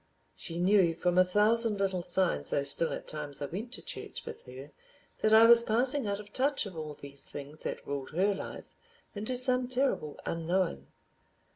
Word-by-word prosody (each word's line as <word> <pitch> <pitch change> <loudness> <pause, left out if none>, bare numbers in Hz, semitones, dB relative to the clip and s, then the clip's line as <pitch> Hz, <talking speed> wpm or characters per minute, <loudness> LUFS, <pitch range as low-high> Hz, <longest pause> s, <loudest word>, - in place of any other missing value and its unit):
She 170 -2 -5
knew 180 -2 +3
from 180 +1 +1
a - - +7
thousand 210 +3 +2
little 195 -2 -1
signs—though 175 -5 0
still 140 +4 +5
at - - -6
times 150 -2 -5
I 145 - -3
went 205 - -6
to - - -9
church - - -7
with - - -8
her—that 135 +10 -6
I 220 +1 +8
was 235 0 +9
passing 245 +3 +1
out 200 0 -2
of 210 0 -12
touch 275 -1 +1
of 190 -3 -9
all 155 -2 -6
these 140 -1 -11
things 145 +2 -9
that - - -5
ruled 140 -2 -5
her 190 +6 +1
life, 195 - -8 0.4
into 215 +5 -3
some 250 0 +1
terrible 255 - -1
unknown. 170 +2 -2
190 Hz, 175 wpm, -30 LUFS, 155-225 Hz, 0.4 s, was